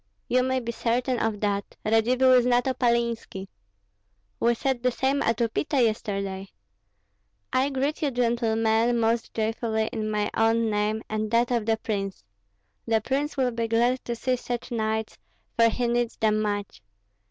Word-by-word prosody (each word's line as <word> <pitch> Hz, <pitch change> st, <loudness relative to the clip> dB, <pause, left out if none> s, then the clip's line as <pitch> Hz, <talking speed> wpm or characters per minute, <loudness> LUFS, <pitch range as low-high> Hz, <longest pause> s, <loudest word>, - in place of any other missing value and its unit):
"You 255 Hz, +1 st, +3 dB
may 260 Hz, 0 st, 0 dB
be 235 Hz, -1 st, -4 dB
certain 245 Hz, +2 st, 0 dB
of 220 Hz, -2 st, -1 dB
that; 200 Hz, -1 st, -2 dB
Radzivill 245 Hz, +4 st, +4 dB
is 250 Hz, -1 st, +4 dB
not 245 Hz, 0 st, +3 dB
Opalinski." 235 Hz, -6 st, -1 dB, 0.9 s
"We 235 Hz, 0 st, +3 dB
said 260 Hz, 0 st, -1 dB
the 250 Hz, -, +2 dB
same 265 Hz, +3 st, 0 dB
at 230 Hz, -1 st, +1 dB
Upita 240 Hz, +5 st, 0 dB
yesterday." 200 Hz, -4 st, -1 dB, 1.1 s
"I 265 Hz, +2 st, +2 dB
greet 275 Hz, +2 st, -2 dB
you, 295 Hz, -, +1 dB
gentlemen, 235 Hz, -1 st, +1 dB
most 230 Hz, 0 st, 0 dB
joyfully 220 Hz, 0 st, -1 dB
in 215 Hz, -1 st, -2 dB
my 210 Hz, -1 st, -1 dB
own 225 Hz, 0 st, +2 dB
name 210 Hz, +1 st, 0 dB
and 215 Hz, 0 st, -2 dB
that 235 Hz, +2 st, +2 dB
of 235 Hz, -3 st, 0 dB
the 225 Hz, 0 st, +2 dB
prince. 195 Hz, -, -4 dB, 0.6 s
The 225 Hz, -1 st, +3 dB
prince 280 Hz, +6 st, -2 dB
will 255 Hz, -2 st, +2 dB
be 230 Hz, -1 st, -2 dB
glad 240 Hz, +3 st, +1 dB
to 235 Hz, -, -2 dB
see 255 Hz, +2 st, -1 dB
such 245 Hz, +1 st, -5 dB
knights, 220 Hz, -1 st, -2 dB, 0.4 s
for 230 Hz, 0 st, +5 dB
he 245 Hz, +2 st, -1 dB
needs 240 Hz, 0 st, 0 dB
them 215 Hz, -1 st, +2 dB
much. 205 Hz, -, -3 dB
230 Hz, 160 wpm, -26 LUFS, 220-245 Hz, 1.1 s, for